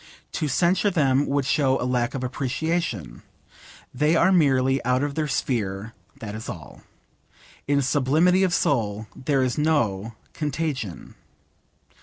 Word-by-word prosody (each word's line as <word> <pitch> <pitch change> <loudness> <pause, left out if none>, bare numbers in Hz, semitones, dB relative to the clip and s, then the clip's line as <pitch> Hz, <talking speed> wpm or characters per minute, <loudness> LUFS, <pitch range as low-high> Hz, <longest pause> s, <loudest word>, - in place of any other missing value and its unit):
To 155 - -2
censure 180 +8 +2
them 140 -6 +2
would 140 -1 0
show 135 -1 +2
'a - - -2
lack 125 -1 0
of 130 - -3
appreciation.' 130 - -2 0.7
They 150 +5 +2
are 185 +3 +4
merely 135 -6 +3
out 125 +2 +1
of 145 -1 -2
their 155 +1 -1
sphere: 110 -6 -2 0.3
that 105 -2 -6
is 110 +1 -7
all. - - -9 0.9
In 140 0 +2
sublimity 155 +8 +3
of 190 -2 +2
soul 110 -10 0
there 135 0 0
is 130 +2 -1
no 115 -9 0 0.2
contagion. 145 - -4
135 Hz, 135 wpm, -24 LUFS, 120-155 Hz, 0.9 s, are